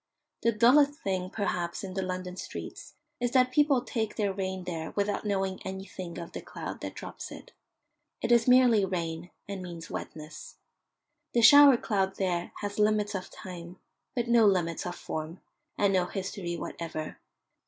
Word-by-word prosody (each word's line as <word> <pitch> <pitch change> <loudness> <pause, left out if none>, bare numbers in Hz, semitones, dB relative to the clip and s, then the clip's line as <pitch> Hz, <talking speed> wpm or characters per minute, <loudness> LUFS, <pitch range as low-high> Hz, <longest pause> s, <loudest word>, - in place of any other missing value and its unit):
The 230 - +3
dullest 265 +7 +5
thing 185 -2 -1
perhaps 180 -4 -2
in 190 -1 -5
the 190 - -1
London 185 -1 -4
streets - - -8 0.2
is 245 0 +1
that 255 -1 +4
people 280 -2 +3
take 220 -5 -2
their 205 -2 0
rain 190 -1 -3
there 165 -3 -4
without 205 +1 -1
knowing 195 -2 -1
anything 190 -2 -6
of 170 - -7
the - - -6
cloud - - -7
that - - -5
drops - - -8
it. - - -11 0.7
It 235 - -1
is 235 0 +5
merely 250 -4 +6
rain, 170 -2 -3 0.2
and 200 -1 -5
means 170 -2 -8
wetness. 155 0 -7 0.8
The 235 - +3
shower 285 +2 +9
cloud 195 -4 0
there 175 -3 -1
has 205 0 -4
limits 210 0 +2
of 190 -2 -4
time, 175 -1 -9 0.4
but 240 -2 0
no 235 -2 +6
limits 175 -4 +1
of 175 - -4
form, 160 +2 -5 0.4
and 200 -1 +3
no 180 -1 +2
history 185 -2 -4
whatever. 160 -2 -5
190 Hz, 165 wpm, -29 LUFS, 180-220 Hz, 0.8 s, shower